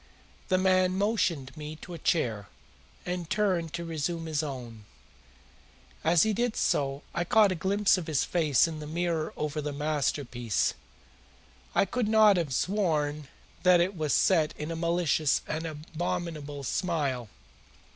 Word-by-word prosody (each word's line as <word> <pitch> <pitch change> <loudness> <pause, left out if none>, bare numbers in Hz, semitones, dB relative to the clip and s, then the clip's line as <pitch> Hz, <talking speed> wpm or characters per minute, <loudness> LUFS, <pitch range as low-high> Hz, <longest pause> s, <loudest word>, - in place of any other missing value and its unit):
The 185 - +2
man 185 0 +3
motioned 185 - 0
me 150 0 -7
to 180 - -8
a 170 - -7
chair, 115 - 0 0.6
and 180 -2 -4
turned 185 -6 0
to 170 0 -4
resume 165 +1 -3
his 155 -2 -1
own. 120 -7 -7 1.2
As 165 0 +4
he 220 - +1
did 235 +1 0
so 140 0 0
I 170 - 0
caught 205 +3 +4
a 170 -3 -4
glimpse 200 0 +3
of 170 - -7
his 155 -4 +1
face 160 -3 +3
in 160 -2 -6
the 150 - -7
mirror 165 0 -1
over 150 0 -2
the 150 0 -3
mantelpiece. 140 -6 -1 1.0
I - - +4
could 235 +3 -1
have 205 -8 +5
sworn 150 -4 0 0.3
that 180 -1 +5
it 185 +3 +1
was 155 -3 -1
set 160 -2 +3
in 150 +2 -4
a - - -3
malicious 165 -3 +1
and 160 +2 -3
abominable 155 -2 -4
smile. 135 - -1
165 Hz, 145 wpm, -28 LUFS, 150-180 Hz, 1.2 s, have